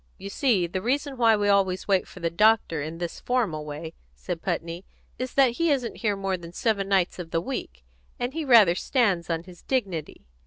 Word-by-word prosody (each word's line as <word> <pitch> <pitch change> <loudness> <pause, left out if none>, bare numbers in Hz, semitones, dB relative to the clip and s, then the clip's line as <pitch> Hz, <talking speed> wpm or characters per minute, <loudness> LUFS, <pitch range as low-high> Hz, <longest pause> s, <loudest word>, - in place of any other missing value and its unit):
"You 200 - -7
see, 215 -8 +2
the 185 +2 -4
reason 275 +5 -1
why 230 -3 +4
we 205 -1 0
always 195 -2 +2
wait 195 -2 +2
for 180 - -12
the 165 0 -1
doctor 210 -4 +3
in 160 +3 -5
this 175 0 -5
formal 205 -12 -1
way," 150 +2 -7 0.2
said - - -5
Putney, 170 +2 -3 0.4
"is 255 0 -4
that 270 -3 +5
he 335 0 +2
isn't 260 -5 +1
in - - -17
here 210 -3 0
more 195 -1 -2
than 170 -1 -11
seven 200 -1 0
nights 190 -2 +1
of 170 -2 -6
the 165 - 0
week, 65 - -6 0.4
and 245 +2 -2
he 320 0 -3
rather 230 - +6
stands 190 -5 0
on 165 0 -1
his 180 -1 -14
dignity. 195 - -3
195 Hz, 210 wpm, -26 LUFS, 170-240 Hz, 0.4 s, rather